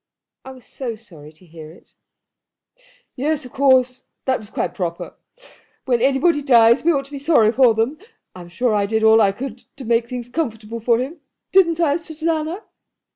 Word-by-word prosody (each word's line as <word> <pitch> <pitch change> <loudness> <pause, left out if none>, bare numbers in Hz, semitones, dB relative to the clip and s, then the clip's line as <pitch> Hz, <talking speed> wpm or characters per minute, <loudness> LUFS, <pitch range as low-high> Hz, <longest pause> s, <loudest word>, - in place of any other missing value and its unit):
"I - - -11
was 255 -3 -13
so 245 -4 -6
sorry 165 -10 -14
to 160 +4 -21
hear 160 -2 -12
it." 165 - -19 1.2
"Yes, 290 +2 -2
of 250 - -12
course. 260 -2 +2 0.2
That 260 -1 0
was 210 -2 -13
quite - - -3
proper. 170 -2 -5 0.7
When 245 -3 +1
anybody 280 +4 +2
dies 235 -3 +4
we 340 - +3
ought 275 -3 -1
to 275 - -16
be 285 - -6
sorry 275 -7 +3
for 240 -2 +4
them. 230 +7 -1 0.3
I'm 175 -1 -11
sure 230 +6 -1
I 205 -1 +1
did 220 +1 -1
all 220 0 +6
I 200 -2 +3
could 245 +3 -7 0.2
to 265 - -10
make 230 0 +1
things 245 -1 -6
comfortable 230 -5 -4
for 230 +1 +2
him. 280 +6 -5 0.3
Didn't 340 -4 +3
I, 305 -3 +2
Susanna?" 325 +3 -3
250 Hz, 180 wpm, -20 LUFS, 220-285 Hz, 1.2 s, all